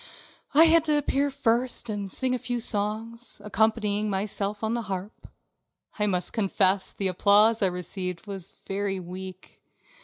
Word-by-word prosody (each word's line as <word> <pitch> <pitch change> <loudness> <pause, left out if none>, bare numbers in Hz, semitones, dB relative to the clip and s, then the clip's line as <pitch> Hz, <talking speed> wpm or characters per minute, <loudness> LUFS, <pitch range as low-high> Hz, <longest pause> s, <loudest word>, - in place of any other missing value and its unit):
I 315 - +9
had 330 -1 +5
to 300 -1 +2
appear 285 0 +1
first 245 -2 0
and 205 -3 -3
sing 255 +6 +1
a 255 - -1
few 245 -1 -3
songs, 225 +2 -3
accompanying 210 0 +1
myself 205 +1 -2
on 220 +1 0
the 235 - -1
harp. 190 +2 -6 0.7
I 210 - +3
must 180 -3 -1
confess 195 -2 +1
the 195 - -2
applause 205 +4 +4
that 195 - +3
I - - +1
received 180 0 -4
was 195 -3 -7
very 195 -1 -2
weak. 185 +1 -9
210 Hz, 155 wpm, -26 LUFS, 190-230 Hz, 0.7 s, I